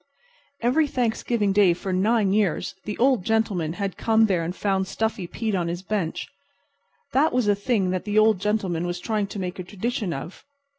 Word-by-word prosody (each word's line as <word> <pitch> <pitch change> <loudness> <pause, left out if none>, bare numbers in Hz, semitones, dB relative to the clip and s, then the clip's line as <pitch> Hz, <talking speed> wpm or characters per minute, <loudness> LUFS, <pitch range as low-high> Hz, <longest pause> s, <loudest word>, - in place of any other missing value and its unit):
Every 290 +6 +3
Thanksgiving 230 -5 0
Day 195 -3 +5
for 190 +1 -4
nine 200 +1 +2
years 205 -6 0
the 210 - -4
Old 255 -5 +3
Gentleman 200 -7 0
had 195 0 -4
come 225 0 +4
there 185 -5 +1
and 175 +3 -4
found 190 -2 0
Stuffy 220 -4 -2
Pete 220 +4 -3
on 175 -3 0
his 175 +2 -4
bench. 195 -5 -2 0.9
That 300 +5 +3
was 250 -4 +1
a 205 - +5
thing 200 -2 0
that 185 +1 -2
the 210 0 -1
Old 215 -2 +5
Gentleman 190 -4 -1
was 175 0 -3
trying 210 +1 -1
to 200 - -8
make 185 0 -4
a - - -3
tradition 205 +1 -3
of. 160 +4 -7
205 Hz, 190 wpm, -24 LUFS, 185-220 Hz, 0.9 s, Day